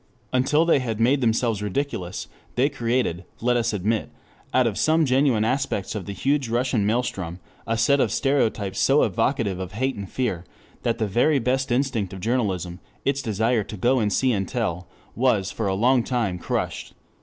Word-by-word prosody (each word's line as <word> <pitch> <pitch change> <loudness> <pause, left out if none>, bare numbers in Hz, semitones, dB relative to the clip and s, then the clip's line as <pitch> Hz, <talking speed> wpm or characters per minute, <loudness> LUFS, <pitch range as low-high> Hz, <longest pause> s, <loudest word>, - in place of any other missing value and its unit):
Until 150 +5 +3
they 165 -4 +4
had 115 -4 -3
made 130 +5 +3
themselves 115 -2 +1
ridiculous 105 -4 -3 0.3
they 130 +4 +3
created, 120 - -1 0.2
let 120 +1 +1
us 120 0 +1
admit, 105 +2 -1 0.4
out 130 -1 +3
of 115 -4 0
some 160 +5 +3
genuine 130 -4 +3
aspects 115 -6 -1
of 105 -3 -5
the - - -3
huge 135 +5 0
Russian 120 -3 +1
maelstrom, 95 -7 -2 0.3
a 115 0 0
set 140 +5 +3
of - - +2
stereotypes 110 -8 0
so 140 +2 +4
evocative 105 -1 0
of 95 0 -6
hate 130 +5 0
and 100 -2 -7
fear, 110 -10 -2 0.4
that 115 -1 0
the 110 - 0
very 120 +9 +2
best 130 +1 0
instinct 120 -7 0
of 95 - -7
journalism, 95 -6 -1 0.3
its 140 0 +1
desire 110 0 +1
to 105 +1 -8
go 125 +7 +2
and 105 -2 +1
see 130 +5 +2
and 95 -4 -1
tell, 90 -8 -2 0.3
was 110 -6 +1
for 110 - -2
a 95 - 0
long 120 +4 +3
time 115 -9 -1
crushed. - - -3
115 Hz, 180 wpm, -24 LUFS, 100-130 Hz, 0.4 s, they